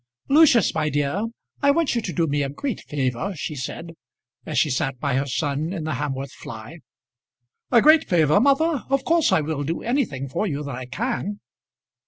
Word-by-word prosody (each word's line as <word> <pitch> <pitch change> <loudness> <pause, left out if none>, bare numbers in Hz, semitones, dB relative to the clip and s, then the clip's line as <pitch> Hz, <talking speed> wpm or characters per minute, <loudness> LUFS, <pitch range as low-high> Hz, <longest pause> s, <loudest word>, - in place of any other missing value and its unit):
"Lucius, 275 - +5
my 155 -1 0
dear, 145 +9 -1 0.4
I 280 - +4
want 315 +1 +2
you 235 - 0
to 195 - -4
do 170 -1 +1
me 145 -1 0
a 140 - -1
great 250 - -4
favour," 140 +7 -2
she 155 - -4
said 150 +5 -6 0.6
as - - -3
she 150 - +3
sat 130 0 -1
by 140 0 -1
her 135 +2 0
son 145 +4 -2
in 180 -5 -4
the 155 - -3
Hamworth 135 0 -3
fly. 115 +9 -10 0.9
"A 235 -3 +5
great 310 0 +6
favour, 160 0 +4
mother! 280 +3 +2
of 275 -1 +1
course 330 -7 +3
I 185 - +4
will 150 -1 -3
do 165 +4 -3
anything 220 - -1
for 175 +11 -2
you 145 -4 -3
that 140 -1 -5
I 125 0 -7
can." 210 - -3
160 Hz, 195 wpm, -23 LUFS, 140-235 Hz, 0.9 s, great